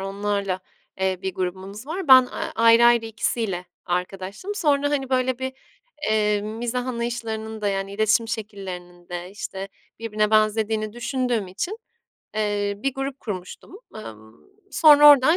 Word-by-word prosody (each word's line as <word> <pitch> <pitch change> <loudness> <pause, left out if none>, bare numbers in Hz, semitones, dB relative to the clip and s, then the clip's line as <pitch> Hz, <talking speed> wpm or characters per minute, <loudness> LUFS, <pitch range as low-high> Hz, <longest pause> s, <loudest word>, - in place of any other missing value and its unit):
onlarla, 195 -1 -2 0.4
eee, 190 -1 +1
bir 190 -1 -3
grubumuz 190 +6 -5
var. 340 0 -4
Ben, 260 -1 +10
aaa, - - -5
ayrı 230 +1 +6
ayrı 235 -1 +5
ikisiyle 220 -4 -2 0.2
arkadaştım. 190 - -3
Sonra, 290 -6 +2
hani, 270 -2 -1
böyle, 255 -1 +1
bir 260 0 -3 0.6
eee, 210 -1 +2
mizah 240 +4 -3
anlayışlarının 230 -2 -4
da 205 - 0
yani 195 0 -2
iletişim 220 +2 +2
şekillerinin 185 -5 -7
de, 175 +1 -6
işte, 195 -1 -6 0.3
birbirine 215 -2 0
benzediğini 215 0 +2
düşündüğüm 240 -3 -1
için, 350 - -4 0.6
eee, 205 -1 0
bir 265 +6 -2
grup 270 0 -4
kurmuştum. 190 - -7 0.2
Emm, 110 - -10 0.4
sonra 295 -2 +8
oradan 290 +4 +6
215 Hz, 135 wpm, -24 LUFS, 195-250 Hz, 0.6 s, Ben